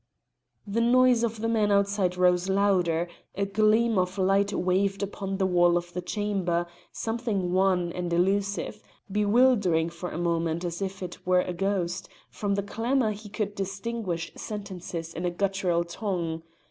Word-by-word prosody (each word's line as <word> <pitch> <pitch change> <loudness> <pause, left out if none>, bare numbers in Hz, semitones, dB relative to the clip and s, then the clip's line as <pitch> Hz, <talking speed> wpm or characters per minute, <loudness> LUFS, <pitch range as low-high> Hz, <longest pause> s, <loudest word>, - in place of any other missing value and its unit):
The 210 +3 -1
noise 245 0 +4
of 225 -2 -2
the 225 - 0
men 215 -2 +2
outside 200 -2 +2
rose 180 0 +3
louder; 180 -4 +2 0.3
a 200 - 0
gleam 215 +2 +3
of 180 +2 -1
light 195 +1 +2
waved 195 +1 +1
upon 195 -1 -4
the 190 - +1
wall 175 -1 +4
of 175 0 -5
the 180 - -3
chamber, 185 -3 -1 0.3
something 225 -6 -2
wan 185 -2 +2
and 175 0 -4
elusive, 195 +3 0 0.3
bewildering 205 -6 +3
for 170 +1 -6
a - - -6
moment 170 0 0
as 175 +2 -4
if 190 0 -4
it 180 -1 -8
were 180 0 +4
a 180 - -4
ghost; 185 -1 -2 0.2
from 200 -1 -1
the 200 - -1
clamour 230 +3 0
he 210 0 -8
could 210 0 -3
distinguish 195 -2 -3
sentences 180 -5 -6
in 175 - -5
a 175 - +1
guttural 185 -2 0
tongue. 170 -3 -3
195 Hz, 160 wpm, -27 LUFS, 175-205 Hz, 0.3 s, noise